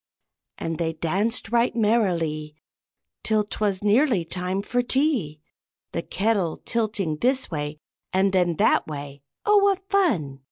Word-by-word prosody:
And 165 -1 -4
they 165 -1 0
danced 195 +9 -1
right 235 0 +2
merrily 170 -9 +1 0.7
Till 215 -1 +2
'twas 205 -2 -2
nearly 210 - +3
time 185 +3 -3
for 245 +3 0
tea, 245 - 0 0.5
The 170 - -2
kettle 195 -3 0
tilting 210 -9 -1
this 255 - +1
way 150 -1 -3 0.3
and 190 +1 +2
then 175 -3 +2
that - - +3
way 140 -2 -7 0.2
oh, 420 0 +5
what 395 -1 +2
fun! 190 - +1
195 Hz, 130 wpm, -24 LUFS, 160-235 Hz, 0.7 s, oh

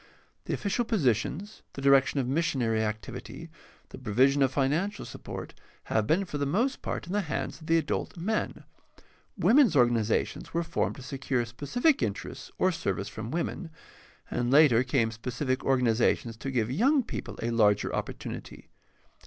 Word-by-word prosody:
The - - -2
official 205 +4 -1
positions, 190 - -1
the 135 - -7
direction 140 0 +4
of 130 - -1
missionary 130 -7 +1
activity, 110 -1 -6 0.4
the - - -10
provision 130 +7 +3
of 135 -1 +4
financial 155 +10 0
support - - -8 0.4
have 110 -1 +2
been 185 +5 +2
for 150 -5 -5
the 140 - +1
most 235 - 0
part - - -4
in 175 - -6
the 205 - +2
hands 165 -1 -4
of 155 - -11
the 165 - +4
adult 160 +2 -2
men; 215 +6 -2 0.7
women's 245 - +5
organizations 120 +2 +1
were 170 - +1
formed - - -1
to 135 - -10
secure 130 -2 -2
specific 245 - +1
interests - - -4
or 185 - +3
service 100 - -2
from 110 +1 -6
women, 170 +3 -3 0.6
and 120 0 0
later 135 -4 +6
came 125 -3 +1
specific 125 +4 -3
organizations 120 -2 +2
to 135 +4 -5
give 120 -3 0
young 260 - +3
people - - -6
a 120 - 0
larger 105 -3 +3
opportunity. - - -6
135 Hz, 155 wpm, -28 LUFS, 120-170 Hz, 0.7 s, later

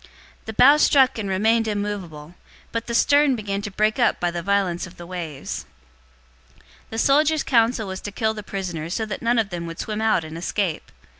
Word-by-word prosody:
The 220 - -5
bow 275 +7 +7
struck 265 -5 +4
and 200 -2 -3
remained 220 +4 +2
immovable, 195 -7 -4 0.4
but 230 -1 -3
the 235 - -2
stern 285 +1 +4
began 200 -3 -3
to 205 - -5
break 215 +4 0
up 240 - +2
by 175 -1 0
the 170 0 -4
violence 190 -2 0
of 180 - -16
the 175 - -9
waves. 170 -6 -6 0.9
027:042 - - -26 0.3
The 225 - -6
soldiers' 300 +5 +3
counsel 230 -3 +2
was 190 0 -6
to 205 - -6
kill 220 +2 0
the 215 - -7
prisoners, 180 -5 -5
so 220 - -1
that 215 - -6
none 235 +1 +1
of 215 -3 0
them 170 -1 -4
would 165 0 -7
swim 215 0 -4
out 215 -6 +2
and 160 +1 -7
escape. 180 -1 -2
205 Hz, 205 wpm, -23 LUFS, 180-230 Hz, 0.9 s, bow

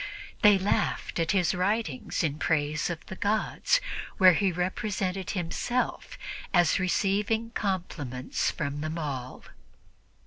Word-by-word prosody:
They 210 -1 +7
laughed 190 -2 0
at 165 -1 0
his 180 -4 +3
writings 185 - -1
in 150 -1 -1
praise 150 -1 0
of 170 -2 -5
the 190 - -7
gods, 215 - +1 0.4
where 185 -2 +8
he 190 +3 +2
represented 185 +1 -2
himself 240 - -2 0.4
as 175 -1 +4
receiving 205 +5 +1
compliments 170 - -2
from 145 -3 -3
them 155 +2 -3
all. 135 -5 -5
180 Hz, 115 wpm, -28 LUFS, 155-200 Hz, 0.4 s, where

